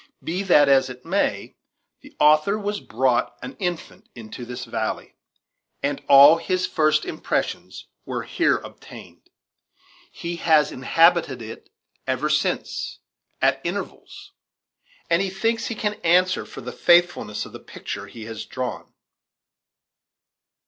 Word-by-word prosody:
Be 175 +4 -2
that 175 -7 +5
as 135 -1 +4
it 125 +2 -11
may, 165 - -1 0.4
the - - -16
author 155 +7 +4
was 205 0 -3
brought 125 +1 0
an 265 - -7
infant 175 -4 -5
into 120 +1 -9
this 125 +1 -7
valley, - - -4 0.7
and 140 0 -1
all 140 +3 +9
his 185 +2 -1
first 155 -2 +1
impressions - - -3 0.2
were - - -4
here - - +1
obtained. - - -13 0.8
He 170 0 -6
has 155 -3 +3
inhabited 165 0 +3
it 110 +1 -10 0.4
ever 130 +4 0
since, 150 - -1 0.5
at 135 0 +2
intervals; 380 - -6 0.8
and 170 +2 +2
he 195 - -1
thinks 225 +4 -1
he 230 - -4
can 210 -1 -1
answer 180 +2 +2
for - - -10
the - - -7
faithfulness 175 -11 +2
of - - -12
the - - -10
picture 100 0 -8
he 110 +2 -10
has 115 -1 -7
drawn. 130 -1 -6
160 Hz, 130 wpm, -23 LUFS, 130-185 Hz, 0.8 s, all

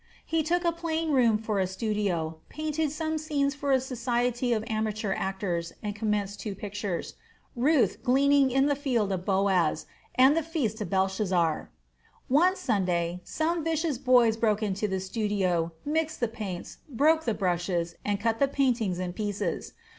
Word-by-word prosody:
He 325 0 +1
took 345 +3 0
a 340 - +4
plain 330 -1 -2
room 240 -6 +4
for 215 -2 -2
a 190 - +1
studio, 190 -6 -2
painted 310 0 -2
some 315 0 -2
scenes 285 -2 0
for 285 -1 -2
a 265 - +5
society 245 -1 -1
of 220 -2 +1
amateur 215 -2 -1
actors, 190 -4 -2
and 210 -1 -2
commenced 210 -1 -1
two 210 -3 -4
pictures, 205 -2 -4 0.4
Ruth 270 +3 +2
gleaning 275 +1 +4
in 270 +2 +3
the 290 0 +2
field 245 -8 0
of 185 -1 -3
Boaz, 190 -5 +2 0.3
and 265 +3 +6
the 330 - +2
feast 285 -10 -2
of 210 - -3
Belshazzar. 190 -4 +1 0.6
One 345 +8 +4
Sunday, 180 - 0
some 325 +1 -1
vicious 320 -4 -1
boys 245 -4 +4
broke 215 -2 +1
into 205 0 -1
the 190 -1 -1
studio, 190 -4 0
mixed 315 +2 -1
the 240 - +1
paints, 205 -6 -6
broke 310 +5 +3
the 225 - 0
brushes, 175 -2 -1
and 205 -1 -1
cut 225 +1 0
the 280 - +4
paintings 245 -9 +1
in 180 -1 -3
pieces. 205 -3 -3
220 Hz, 160 wpm, -28 LUFS, 195-280 Hz, 0.6 s, and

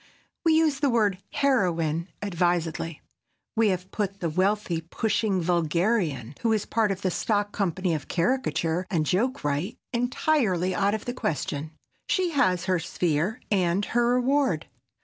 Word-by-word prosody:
We 325 -2 +4
use 315 -3 +3
the 285 -1 +2
word 210 -6 +2
"heroine" 175 - +1 0.2
advisedly. 170 -4 -1 0.5
We 225 -1 +4
have 185 -1 -1
put 200 -2 -2
the 170 -2 -1
wealthy 185 -1 +1
pushing 210 +3 0
vulgarian, 170 - 0
who 230 -1 +2
is 215 - 0
part 220 -2 +1
of 195 0 -4
the 185 - +1
stock 205 +2 0
company 185 -3 -1
of 150 -4 -4
caricature 180 -4 0
and 165 -6 +1
joke 225 - 0
wright, 145 +8 -1 0.2
entirely 235 - +1
out 200 +3 +2
of 215 - -6
the 245 - -3
question. 150 - -2 0.4
She 370 -2 +1
has 185 - +2
her 185 -2 +1
sphere 165 +5 -1
and 190 0 +2
her 240 +1 +3
reward. 250 - +1
190 Hz, 150 wpm, -26 LUFS, 170-230 Hz, 0.5 s, We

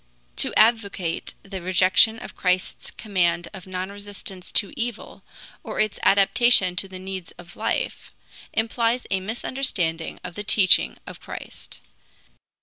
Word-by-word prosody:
To - - +2
advocate 205 -6 +1
the 195 -2 -7
rejection 185 +5 +4
of - - -9
Christ's 180 0 -1
command 175 -5 0
of 190 -2 -10
non 185 +1 -4
resistance 200 -2 -7
to 200 - +3
evil, 235 -2 -5 0.4
or - - -5
its 215 -1 0
adaptation 200 -1 +5
to 195 - +2
the 190 -1 -9
needs 190 -2 -7
of 175 -1 -13
life, - - -3 0.4
implies 230 +2 0
a 190 - +1
misunderstanding 190 -6 -2
of - - -7
the 205 - -5
teaching 200 -3 +4
of - - -10
Christ. - - -10
195 Hz, 135 wpm, -23 LUFS, 185-220 Hz, 0.4 s, adaptation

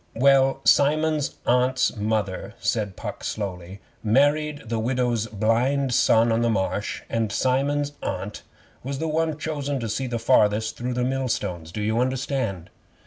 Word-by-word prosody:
'Well, 135 +1 +4
Simon's 150 +1 +3
Aunt's 125 +1 +2
mother,' 105 -3 -2
said 105 -4 -1
Puck - - -7
slowly, 95 -2 -5 0.2
'married 145 +6 +2
the 115 0 -1
Widow's 120 -1 0
blind 120 +6 +1
son 115 0 +4
on 115 +1 +2
the 120 - +2
Marsh, 100 0 -2
and 115 -2 -1
Simon's 140 +5 +1
Aunt 95 +3 -4 0.4
was 135 +2 -4
the 160 - -2
one 160 -1 0
chosen 145 -3 -3
to 115 - -3
see 110 +5 -2
farthest 110 -2 +2
through 125 +1 -3
millstones. 125 -10 -2
Do 105 +3 -4
you 110 +2 +1
understand? 130 - -2
120 Hz, 140 wpm, -24 LUFS, 110-140 Hz, 0.4 s, Well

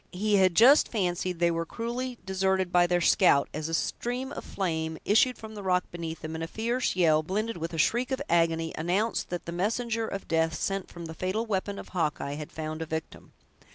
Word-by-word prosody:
He 205 +3 +2
had 185 -3 +4
just 260 - +7
fancied 180 -4 -1
they 170 0 +3
were 165 0 -1
cruelly 240 +7 -4
deserted 190 -1 0
by 175 -1 +4
their 175 0 +1
scout, 155 -6 +4
as 155 +1 -3
a - - -4
stream 250 +9 -2
of - - -6
flame 160 -4 -2
issued 250 +4 +4
from 220 0 -9
the 210 - -7
rock 180 -2 +2
beneath 165 -2 -6
them, 155 0 -5
and 160 0 -4
a - - -3
fierce 235 +5 -1
yell, 160 -4 +4
blended 210 +7 -2
with 165 0 -4
a 165 - -5
shriek 240 +10 +2
of 265 - -1
agony, 165 -1 +1
announced 185 +8 0
that 175 -1 -4
the 170 - -5
messenger 225 +5 -1
of 195 -2 -6
death 160 -1 +1
sent 195 +3 -2
from 170 -1 -9
the 160 - -7
fatal 185 +7 -2
weapon 200 -1 -2
of - - -9
Hawkeye, 150 -5 -1
had 150 0 -7
found 155 0 -5
a 160 - -4
victim. 160 0 -6
180 Hz, 215 wpm, -28 LUFS, 165-215 Hz, -, just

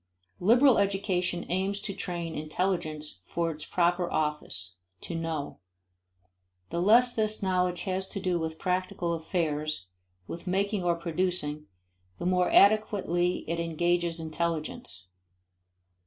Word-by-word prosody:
Liberal 240 +6 +6
education 190 -3 0
aims 190 +3 0
to 200 - -3
train 170 -3 -4
intelligence 155 - -2
for 170 - -1
its 150 -1 -6
proper 175 0 +1
office: 95 - -1 0.2
to - - -6
know. 165 -3 -3 1.1
The 170 - -1
less 240 +6 +6
this 215 -1 -1
knowledge 180 -1 +1
has 190 0 -1
to 200 - -4
do 180 -2 0
with 160 0 -3
practical 180 -1 -1
affairs, 155 - -2 0.4
with 170 - -8
making 200 +1 0
or 175 -1 +2
producing, 170 -3 -2 0.5
the - - -5
more 180 0 +3
adequately 195 -4 +3
it 170 +1 -1
engages 170 +1 +1
intelligence. 155 - -3
175 Hz, 120 wpm, -29 LUFS, 160-190 Hz, 1.1 s, Liberal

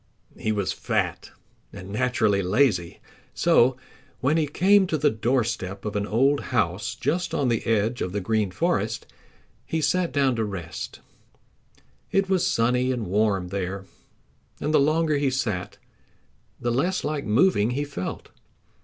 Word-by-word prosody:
He 110 - -2
was 100 -3 -1
fat - - -2 0.4
and 95 +2 -9
naturally 105 -2 +1
lazy, 95 -3 +1 0.4
so 125 +1 +4 0.4
when 140 +4 +2
he 160 -2 +2
came 190 +6 +4
to 160 - 0
the 145 0 +3
doorstep 110 -4 -1
of 105 - -3
an 100 0 -1
old 135 +6 +2
house 105 -4 -1
just 165 +7 -1
on 135 -3 +1
the 115 -2 0
edge 115 +2 +1
of 90 - -2
the 105 - -2
Green 105 +1 0
Forest 90 - -1 0.6
he 160 - -2
sat 180 +2 +1
down 135 -3 +2
to 110 - +1
rest. 95 -6 -6 1.1
It 195 0 +2
was 185 -2 +2
sunny 125 +2 +2
and 120 -4 -2
warm 100 -1 +1
there, 95 0 -4 0.7
and 155 - -1
the - - +6
longer 155 +1 +2
he 140 -1 +1
sat 110 -9 -2 0.8
the 120 - -1
less 175 +10 0
like 150 -1 -2
moving 115 - +3
he 135 +4 -1
felt. 140 -11 -6
120 Hz, 150 wpm, -25 LUFS, 100-145 Hz, 1.1 s, the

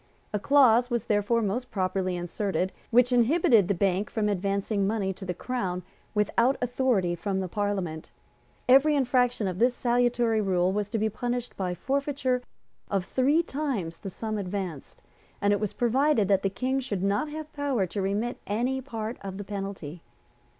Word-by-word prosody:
A 210 - +1
clause 250 -1 +5
was 235 -2 -1
therefore 215 +2 +1
most 225 +5 -2
properly 185 -1 -1
inserted 185 +2 -2 0.2
which 245 +2 +4
inhibited 240 - +4
the 200 - +1
Bank 195 +2 +1
from 210 -2 0
advancing 200 +1 0
money 200 -3 -1
to 190 +1 -9
the 180 - -2
Crown 185 -6 -3 0.3
without 235 +5 +2
authority 245 -7 +1
from 190 +2 -2
Parliament. 190 -6 -2 0.6
Every 275 +4 +6
infraction 245 -5 +2
of 185 0 -3
this 245 +2 +3
salutary 240 -2 +2
rule 185 -2 +2
was 205 +1 -2
to 225 - -1
be 220 0 +1
punished 245 +3 -3
by 180 -2 -2
forfeiture 275 0 -1 0.5
of 195 -2 0
three 285 - +2
times 255 - -3
the 195 - -6
sum 215 +3 -4
advanced; 185 -6 -5 0.4
and 205 0 +3
it 205 - +1
was 210 -2 -2
provided 250 -1 +2
that 195 -1 +4
the 195 - +1
King 255 +7 -1
should 205 -8 -3
not 205 +9 +1
have 310 0 -7
power 280 -8 0
to 195 +3 -4
remit 205 +5 -1
any 245 +6 0
part 225 -3 -5
of 195 -1 -6
the 205 - -5
penalty. 195 -5 -6
210 Hz, 165 wpm, -27 LUFS, 195-250 Hz, 0.6 s, Every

